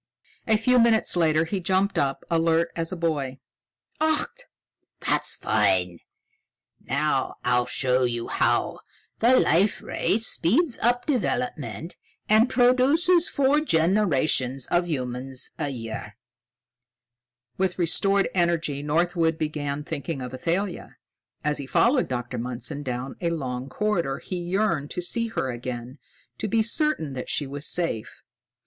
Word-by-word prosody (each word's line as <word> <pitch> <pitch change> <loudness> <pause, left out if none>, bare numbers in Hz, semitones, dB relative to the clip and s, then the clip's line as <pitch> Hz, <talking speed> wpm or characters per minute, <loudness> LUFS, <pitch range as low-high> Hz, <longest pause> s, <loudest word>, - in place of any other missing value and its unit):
A 220 -1 +4
few 250 +3 +3
minutes 230 -4 +3
later, 160 -2 +3
he 195 +4 -2
jumped 190 +3 +1
up, 135 -1 0
alert 165 0 +2
as 165 -1 -2
a - - -3
boy. 145 -6 -1 0.6
"Ach! 315 +11 0 0.5
That's - - +1
fine. 95 -5 +1 0.8
Now - - 0
I'll 125 0 +2
show 130 -1 +1
you 120 -1 -2
how - - +1 0.4
the 250 +3 +5
Life 195 +5 +3
Ray 185 +5 0
speeds 230 - +1
up 245 +1 +2
development 245 - -2 0.3
and 220 +4 +5
produces 275 +9 +4
four 280 +2 +3
generations 160 - +1
of 175 0 +2
humans 130 -2 -4
a 145 - -1
year." 115 -4 -6 1.4
With 190 -2 0
restored 195 +3 +3
energy, 170 -5 0
Northwood 165 +2 +1
began 150 -2 -3
thinking 150 -1 -4
of 125 0 -6
Athalia. 175 +8 -3 0.5
As 150 0 0
he 140 - -6
followed 250 - +3
Dr. 125 -1 -4
Mundson 125 +5 -3
down 130 -1 -5
a 170 - +1
long 130 -5 -4
corridor, 170 -8 -1
he 185 - -5
yearned 175 -4 0
to - - -4
see 230 +6 0
her 135 - -2
again, 120 +2 -6 0.4
to - - -2
be 220 +2 +2
certain 230 - 0
that 125 -1 -6
she 145 - 0
was 145 +2 -4
safe. 165 -11 -2
165 Hz, 130 wpm, -25 LUFS, 135-215 Hz, 1.4 s, the